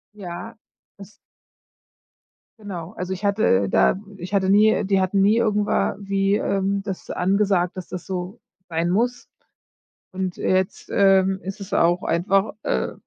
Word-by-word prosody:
Ja, 180 Hz, +2 st, -8 dB, 0.4 s
es 200 Hz, +1 st, -12 dB, 1.5 s
Genau. 185 Hz, -5 st, -7 dB
Also, 180 Hz, +1 st, -5 dB
ich 190 Hz, +3 st, -6 dB
hatte 200 Hz, -, +2 dB
da 185 Hz, -, +3 dB, 0.2 s
ich 185 Hz, +2 st, -8 dB
hatte 190 Hz, -1 st, +2 dB
nie 210 Hz, +2 st, +6 dB
äh, -, -, +1 dB
die 195 Hz, 0 st, +2 dB
hatten 190 Hz, +1 st, +1 dB
nie 205 Hz, +3 st, +4 dB
irgendwa 210 Hz, -3 st, +1 dB
wie, 195 Hz, 0 st, 0 dB
ähm, 195 Hz, -1 st, 0 dB
das 195 Hz, -2 st, -6 dB
angesagt, 190 Hz, -1 st, +1 dB
dass 185 Hz, -2 st, -7 dB
das 180 Hz, 0 st, -6 dB
so 185 Hz, 0 st, -5 dB, 0.3 s
sein 165 Hz, +1 st, -1 dB
muss. 240 Hz, +6 st, 0 dB, 0.9 s
Und 185 Hz, -1 st, -3 dB
jetzt, 185 Hz, 0 st, -1 dB
ähm, 195 Hz, -1 st, +4 dB
ist 195 Hz, +2 st, -6 dB
es 200 Hz, 0 st, -8 dB
auch 175 Hz, 0 st, +2 dB
einfach, 195 Hz, +5 st, +1 dB
äh, -, -, -1 dB
195 Hz, 145 wpm, -22 LUFS, 180-200 Hz, 1.5 s, nie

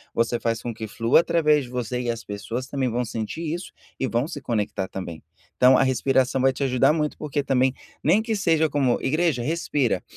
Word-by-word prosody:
você 115 Hz, +1 st, +1 dB
faz 115 Hz, 0 st, -1 dB
com 120 Hz, -, -3 dB
que 110 Hz, 0 st, -6 dB
flua 115 Hz, +5 st, +3 dB
através 150 Hz, -4 st, +2 dB
de -, -, -12 dB
você, 125 Hz, 0 st, -3 dB
e 120 Hz, -, -3 dB
as 115 Hz, 0 st, -3 dB
pessoas 115 Hz, +5 st, -5 dB
também 135 Hz, -2 st, -1 dB
vão 120 Hz, +1 st, -1 dB
sentir 115 Hz, +8 st, -5 dB
isso 175 Hz, +3 st, -6 dB, 0.3 s
e 130 Hz, -, 0 dB
vão 120 Hz, +3 st, 0 dB
se 145 Hz, -3 st, -7 dB
conectar 105 Hz, -5 st, -2 dB
também. 90 Hz, -4 st, -7 dB, 0.4 s
Então 130 Hz, +1 st, +6 dB
a -, -, +4 dB
respiração 130 Hz, 0 st, +1 dB
vai 135 Hz, +1 st, +4 dB
te 140 Hz, -, -3 dB
ajudar 130 Hz, +1 st, +3 dB
muito 150 Hz, -1 st, -1 dB
porque 145 Hz, -1 st, -2 dB
também, 130 Hz, -1 st, +2 dB, 0.3 s
nem 170 Hz, +8 st, +4 dB
que 225 Hz, 0 st, -2 dB
seja 165 Hz, -6 st, +2 dB
como 135 Hz, -4 st, +1 dB
igreja 155 Hz, -3 st, +1 dB
respira. 145 Hz, -, 0 dB
130 Hz, 205 wpm, -24 LUFS, 115-150 Hz, 0.4 s, Então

